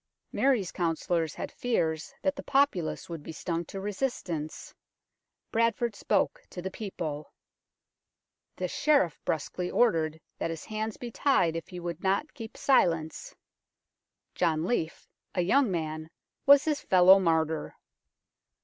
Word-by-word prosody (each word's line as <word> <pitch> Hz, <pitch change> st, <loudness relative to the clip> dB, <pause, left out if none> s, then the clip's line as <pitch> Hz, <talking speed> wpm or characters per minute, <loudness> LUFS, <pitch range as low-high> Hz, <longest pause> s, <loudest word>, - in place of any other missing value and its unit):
Mary's 245 Hz, -10 st, +2 dB
councillors 165 Hz, -1 st, -1 dB
had -, -, -5 dB
fears 160 Hz, -, -1 dB
that 285 Hz, 0 st, +1 dB
the 280 Hz, -, -6 dB
populace 270 Hz, -, +1 dB
would 165 Hz, -3 st, -6 dB
be 155 Hz, -, -8 dB
stung 170 Hz, +1 st, -3 dB
to 195 Hz, +3 st, -7 dB
resistance. 190 Hz, -, -3 dB, 0.8 s
Bradford 230 Hz, 0 st, +1 dB
spoke -, -, 0 dB
to -, -, -8 dB
the 190 Hz, +2 st, -4 dB
people; 165 Hz, -8 st, -5 dB, 1.2 s
the -, -, -2 dB
Sheriff 280 Hz, -, +2 dB
brusquely 175 Hz, +3 st, -2 dB
ordered 160 Hz, -9 st, +2 dB, 0.2 s
that -, -, -1 dB
his 165 Hz, -2 st, -6 dB
hands 215 Hz, 0 st, -3 dB
be 240 Hz, -1 st, -7 dB
tied 215 Hz, -, +2 dB
if 165 Hz, -, -4 dB
he 180 Hz, -, -8 dB
would 170 Hz, -1 st, -5 dB
not 195 Hz, +11 st, 0 dB
keep 225 Hz, -5 st, -9 dB
silence. 170 Hz, -, +1 dB, 1.0 s
John 160 Hz, -2 st, +1 dB
Leaf, 165 Hz, -7 st, -2 dB, 0.3 s
a 180 Hz, -, +2 dB
young 255 Hz, +8 st, +3 dB
man, 155 Hz, -2 st, -3 dB, 0.4 s
was 280 Hz, +1 st, +8 dB
his 305 Hz, -2 st, 0 dB
fellow 185 Hz, +1 st, +7 dB
martyr. 160 Hz, -3 st, 0 dB
180 Hz, 130 wpm, -29 LUFS, 160-235 Hz, 1.2 s, was